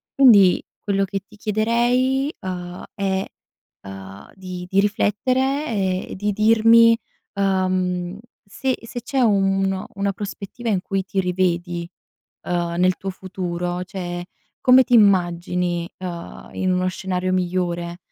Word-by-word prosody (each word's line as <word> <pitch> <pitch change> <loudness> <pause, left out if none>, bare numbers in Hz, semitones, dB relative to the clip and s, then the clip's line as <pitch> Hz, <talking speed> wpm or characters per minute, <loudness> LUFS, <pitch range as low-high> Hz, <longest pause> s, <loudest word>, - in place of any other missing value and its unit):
Quindi, 205 -9 +6 0.2
quello 195 -1 +1
che 195 0 -4
ti 210 - -17
chiederei, 240 +6 +1
uhm, 180 -1 -6
è, 195 -1 -1 0.6
uhm, 95 0 -10
di 185 -2 -7
di 195 - +2
riflettere 255 +8 0 0.4
e - - -7
di 205 +2 -1
dirmi, 230 +2 +6 0.4
uhm, 185 -2 0 0.3
se 260 +6 -2
se 240 +1 -6
c'è 265 +3 -2
uno 195 -3 +1
una 200 0 -1
prospettiva 205 +4 -6
in 190 -4 +1
cui 195 0 -2
ti 195 0 -2
rivedi, 175 -1 -1 0.5
uhm, 175 -1 -1
nel 185 0 +3
tuo 195 - -5
futuro. 180 -1 -4
Cioè, 175 -2 -5 0.4
come 255 +1 +7
ti 250 - -2
immagini, 175 -3 +2
ehm, 175 -2 -7
in 185 -1 0
uno 180 0 +1
scenario 185 0 -2
migliore? 175 -1 -1
190 Hz, 125 wpm, -22 LUFS, 180-210 Hz, 0.6 s, come